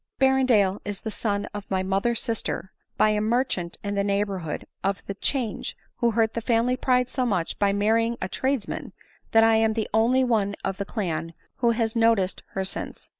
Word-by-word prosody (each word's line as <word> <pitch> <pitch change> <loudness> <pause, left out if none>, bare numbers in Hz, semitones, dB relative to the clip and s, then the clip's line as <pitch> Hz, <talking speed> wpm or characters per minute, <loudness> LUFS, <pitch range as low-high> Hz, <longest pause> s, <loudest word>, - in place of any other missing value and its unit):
Berrendale 255 -8 +3
is 205 -1 -4
the 220 - -4
son 205 -2 -1
of 205 -1 -7
my 190 -1 0
mother's 195 +5 +1
sister, 220 -4 -3 0.3
by 215 - +5
a 210 0 +1
merchant 215 -6 0
in 205 0 -2
the 200 0 +1
neighborhood 200 -5 -1 0.2
of 195 0 -1
the 200 - -4
'Change, 235 +2 -2 0.2
who 235 - +2
hurt 225 0 +1
die 230 - -2
family 235 +2 +2
pride 250 -1 +2
so 255 0 -1
much 190 -9 -1
by 200 -1 +3
marrying 225 +3 +2
a - - -2
tradesman, 260 +3 -2 0.4
that 225 0 +6
I 225 0 +5
am 220 0 +3
the 220 -1 -1
only 240 +4 +4
one 210 -5 +1
of 195 -1 -2
the 200 - -3
clan 165 -6 -3 0.2
who 240 - +2
has 225 -1 0
noticed 225 -5 +2
her 190 0 -1
since. 190 - -6
215 Hz, 190 wpm, -25 LUFS, 200-235 Hz, 0.4 s, that